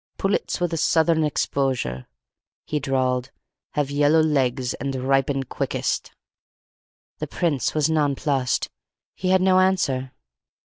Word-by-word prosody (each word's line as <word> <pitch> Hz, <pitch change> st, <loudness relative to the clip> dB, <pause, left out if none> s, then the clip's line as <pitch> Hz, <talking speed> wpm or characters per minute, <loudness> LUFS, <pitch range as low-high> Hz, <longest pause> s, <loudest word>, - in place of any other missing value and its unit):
"Pullets 195 Hz, 0 st, -1 dB
with 175 Hz, -2 st, -1 dB
a -, -, 0 dB
southern 160 Hz, 0 st, +3 dB
exposure," 130 Hz, -, -1 dB, 0.6 s
he 150 Hz, -, -1 dB
drawled, 130 Hz, -2 st, 0 dB, 0.4 s
"have 145 Hz, -1 st, -1 dB
yellow 145 Hz, +2 st, +4 dB
legs 130 Hz, -5 st, +1 dB
and 135 Hz, -1 st, -4 dB
ripen 135 Hz, +1 st, +1 dB
quickest." -, -, -2 dB, 1.1 s
The -, -, -3 dB
Prince 155 Hz, -7 st, -1 dB
was 155 Hz, -1 st, +3 dB
nonplussed. 145 Hz, -4 st, 0 dB, 0.4 s
He 185 Hz, -, -2 dB
had 185 Hz, 0 st, +4 dB
no 185 Hz, 0 st, +5 dB
answer. 140 Hz, -9 st, +1 dB
140 Hz, 120 wpm, -23 LUFS, 130-160 Hz, 1.1 s, no